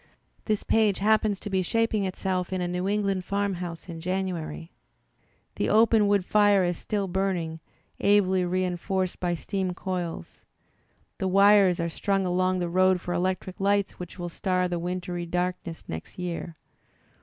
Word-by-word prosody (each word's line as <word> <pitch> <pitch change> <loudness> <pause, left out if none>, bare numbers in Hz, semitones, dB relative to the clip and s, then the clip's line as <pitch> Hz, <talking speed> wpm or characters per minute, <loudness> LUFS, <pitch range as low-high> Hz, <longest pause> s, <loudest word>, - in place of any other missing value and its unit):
This 215 -2 0
page 215 -3 +2
happens 215 -1 +2
to - - -5
be 190 -1 +2
shaping 220 +1 +1
itself 185 -1 -2
in 185 - -1
a 180 - -1
New 180 +2 -2
England 200 -2 0
farmhouse 185 -4 -3
in 165 -2 -7
January. 175 - -3 0.9
The - - 0
open 220 -1 +5
wood 200 -2 +2
fire 205 -2 +4
is 175 0 0
still 200 +3 -2
burning, 175 -3 -1 0.4
ably 190 -2 +3
reinforced 185 +1 -1
by 175 -1 0
steam 185 +1 -3
coils. 180 -3 -5 0.8
The 190 - 0
wires 195 -1 +5
are 170 - 0
strung 195 +3 -1
along 185 +1 +1
the 175 -1 -1
road 185 +1 +3
for 175 0 -4
electric 185 +1 -2
lights 200 0 +1
which 180 0 -8
will 175 -1 -4
star 180 +1 0
the 175 -1 -2
wintry 175 0 -4
darkness 180 -1 -3
next 80 0 -7
year. 175 -2 -5
185 Hz, 155 wpm, -26 LUFS, 175-195 Hz, 0.9 s, open